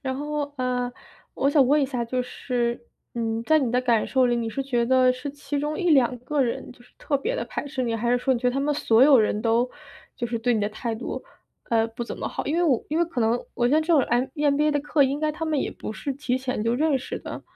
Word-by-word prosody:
然 260 -1 -3
后， 295 0 -3
呃， 250 -1 -1 0.4
我 275 - +1
想 285 -3 +5
问 290 +2 +4
一 - - +3
下， 250 -3 -2
就 250 +2 -1
是， 240 -1 -3 0.3
嗯， 225 -1 -2
在 315 +5 +4
你 250 -4 -1
的 250 - +3
感 235 -3 +2
受 260 -1 +3
里， 240 -1 +1
你 230 -1 -2
是 270 +5 -3
觉 240 -3 0
得 255 0 +4
是 255 +3 -6
其 290 0 -4
中 300 +1 -2
1-2 270 -9 +3
个 285 +3 -1
人 240 -3 -1
就 245 - -16
是 245 - -23
特 280 -2 -1
别 480 - -2
的 - - -2
排 - - -5
斥 270 -2 -3
你， 230 -2 -1
还 235 +2 -1
是 - - +4
说 265 +1 +1
你 250 - 0
觉 250 - -1
得 - - -1
他 275 - 0
们 295 +1 +1
所 235 -4 +3
有 275 -3 +7
人 210 0 +1
都 235 +2 +2 0.5
就 240 - -4
是 235 0 -2
对 240 +1 +1
你 215 - 0
的 205 - 0
态 225 +2 -4
度， 230 - -6 0.4
呃， 225 -1 +2
不 230 +1 -6
怎 - - -6
么 - - -3
好， - - -5
因 295 - 0
为 350 - +2
我 270 -9 +2
因 310 - -1
为 340 - +3
可 275 -8 -4
能 230 +2 +1
我 240 - +1
觉 290 - +3
得 310 - +4
这 315 - -6
种 300 - +6
M 240 +1 +1
EMBA 295 +1 +2
的 290 - +1
课， 295 0 +2
应 275 +2 +1
该 310 0 0
他 325 - -4
们 310 -3 0
也 - - -1
不 - - -7
是 280 +5 -4
提 260 -2 -2
前 255 -4 -3
就 230 +1 +1
认 305 0 +2
识 255 - -5
的， - - -8
255 Hz, 310 characters per minute, -25 LUFS, 240-290 Hz, 0.5 s, 有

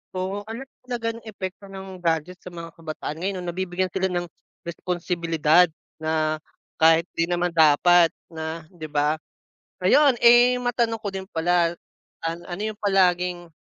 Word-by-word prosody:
Oo 190 +2 -2
ano 225 +4 -6 0.2
talaga 235 -2 -2
ng 230 - -12
epekto 195 -1 -7
ng 190 -1 -9
gadget 170 +2 -1
sa - - -13
mga 170 -1 -8
kabataan 155 -1 -6
ngayon 190 +1 -2
no? - - -7
Nabibigyan 185 0 -2
sila 190 0 0
ng 175 -1 -1 0.4
responsibilidad 170 -1 +2 0.3
na 155 0 0 0.4
kahit 165 +1 +6
di 165 - 0
naman 175 0 0
dapat 165 +2 +6 0.2
na 160 0 -5
di 160 -4 -8
ba. 150 +1 +1 0.7
Ayun, 290 -3 +5
eh, 240 +1 +7
matanong 235 -2 0
ko 205 - -3
din 190 0 -5
pala, 170 +1 +2 0.5
an 165 +1 -2
ano 180 +4 -5
yung 210 - -21
palaging 180 -3 +2
175 Hz, 150 wpm, -24 LUFS, 165-195 Hz, 0.7 s, eh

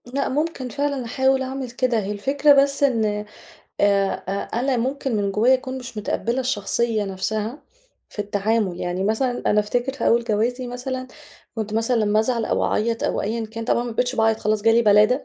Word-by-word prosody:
لأ 265 +3 -2
ممكن 295 -2 -2
فعلًا 280 -1 -2
أحاول 265 +3 +1
أعمل 265 -1 -4
كده، 245 -2 +1
هي 200 -1 -3
الفكرة 275 +8 +3
بس 280 0 -1
إن 215 -6 +1 0.6
آآ 200 -1 +3 0.2
أ 200 +4 -2
أنا 265 -1 +1
ممكن 265 +1 -1
من 200 -1 0
جوايا 225 +6 +4
أكون 260 0 -2
مش 245 -3 -8
متقبلة 235 +4 -1
الشخصية 230 -2 0
نفسها 215 +7 -3 0.5
في - - -12
التعامل، 205 -2 0
يعني 180 +1 -2
مثلًا 245 +4 0
أنا 210 - +4
أفتكر 245 +5 -1
في 275 - -1
أول 235 +1 +3
جوازي 240 +3 -1
مثلًا 255 +1 -5 0.5
كنت 215 -2 -4
مثلًا 225 +3 +1
لمّا 210 +1 +3
أزعل 230 0 0
أو - - 0
أعيط 230 +1 0
أو - - 0
أيًا 225 +2 -2
كان، 225 +1 -7
طبعًا 235 - +1
ما 240 - -4
بقيتش 245 +3 -1
باعيط 225 -1 +2
خلاص 215 0 0
جه 225 +2 +4
لي 230 +1 +4
بَلادة، 215 +5 +4
230 Hz, 190 wpm, -22 LUFS, 210-260 Hz, 0.6 s, جوايا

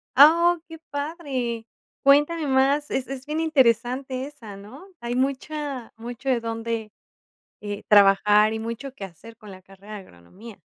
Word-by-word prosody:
Ah, 335 +5 +7
oh, - - -38
qué 325 -1 -10
padre. 280 -6 -4 0.4
Cuéntame 295 +3 +4
más, 275 +2 +2
es 260 - -2
es 270 -1 -7
bien 305 +2 -3
interesante 260 -3 +1
esa, 230 -9 -11
¿no? 255 - -13
Hay 240 +1 -4
mucha 275 -1 -3
mucho 240 +4 -9
de 240 -3 +1
dónde, 225 -1 -4 0.7
eh, 205 -1 -6
trabajar 210 +1 +5
y - - -3
mucho 230 +4 -6
que 195 - -8
hacer 215 +6 -12
con 210 -3 -13
la 185 0 -11
carrera 195 +2 -13
de - - -6
agronomía. 190 - -14
245 Hz, 155 wpm, -24 LUFS, 215-285 Hz, 0.7 s, Ah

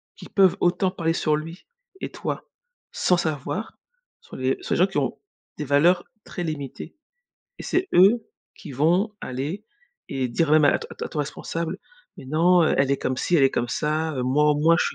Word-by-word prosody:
qui - - -11
peuvent 190 -3 +4
autant 185 +1 +1
parler 165 -3 -1
sur 155 -2 +1
lui 165 +4 -7 0.4
et - - -4
toi, - - -5 0.5
sans 180 - +2
savoir, 155 - -3 0.4
sont - - -13
les 130 +1 0
sont - - -2
les - - +1
gens 185 - +5
qui 190 - -5
ont, - - -1 0.4
des 150 - -4
valeurs 150 +6 +3 0.2
très 175 - -6
limités 155 0 -6 0.6
et - - -7
c'est 370 +1 -1
eux 215 +5 +5 0.3
qui 155 - -11
vont 175 - +2
aller 145 +11 -4 0.4
et 130 -2 -2
dire 150 +6 0
même 155 -1 +6
à 145 - +4
t - - -8
à - - -6
ton 150 - -6
responsable: 165 +4 -3 0.4
«Mais - - -11
non, 170 +5 +4
elle 140 -3 +2
est 140 - +3
comme 130 - -2
ci, 175 +6 +1
elle 140 - +4
est 135 - +4
comme 120 - -1
ça, 155 +4 -1
heu, 125 - -1
moi 145 +4 +2
au 150 - +3
moins, 165 +3 +4
je - - +2
155 Hz, 200 wpm, -24 LUFS, 140-175 Hz, 0.6 s, même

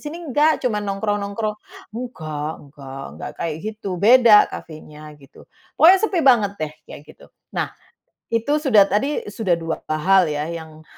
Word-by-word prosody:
sini 330 +3 -8
enggak 295 +1 +1
cuma 215 -4 0
nongkrong-nongkrong. 205 +1 -2 0.4
Nggak, 155 -11 -5 0.2
nggak, 135 -1 -9 0.2
nggak - - -5
kayak 165 -3 -3
gitu. 215 -1 -6
Beda 230 -1 +6
kafenya 155 -1 -11
gitu. 135 0 -17 0.3
Pokoknya 365 +4 +7
sepi 410 -4 0
banget 225 -7 +4
deh 155 -1 -3 0.2
kayak - - -10
gitu. - - -16 0.3
Nah, - - -1 0.6
Itu 230 +7 0
sudah 250 -9 +5
tadi, 275 +9 0
sudah 195 -5 0
2 165 -1 -4
hal 180 +4 +3
ya 150 -1 -2
yang, 160 -2 -9
205 Hz, 150 wpm, -21 LUFS, 155-245 Hz, 0.6 s, Pokoknya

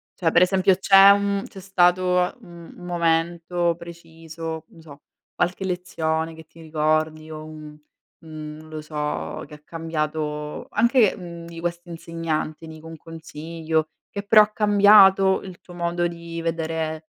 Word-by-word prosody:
Cioè 165 -3 0
per 170 - +4
esempio, 190 +1 +4
c'è 195 +1 +7
un 200 0 +2
mhmm, 195 - -4
c'è 195 - -12
stato 180 -1 +2
un 170 -1 -13
un 180 - -11
momento 170 0 0
preciso, 165 -1 -8
non 165 - -17
so, 145 -2 -14 0.3
qualche 180 +2 -1
lezione 165 -3 -2
che 160 0 -13
ti 165 - -17
ricordi 155 0 -1
o 155 0 -7
un 155 -1 -11 0.4
un 155 -2 -9
non 155 0 -14
lo 155 -1 -6
so, 150 - -4
che - - -15
ha 150 - -11
cambiato 155 -2 -4
anche, 235 -1 +3
mhmm, 170 -2 -9
di 170 0 -10
questa 175 0 -4
insegnante, 165 -1 -4
dico 160 0 -11
un 165 0 -9
consiglio, 160 0 -4 0.2
che 200 - -6
però 215 +1 +7
ha 210 - +3
cambiato 205 -2 +5
il 185 -3 -10
tuo 175 - -14
modo 175 0 -1
di 170 0 -7
vedere 160 -1 -3
165 Hz, 155 wpm, -23 LUFS, 155-180 Hz, 0.4 s, c'è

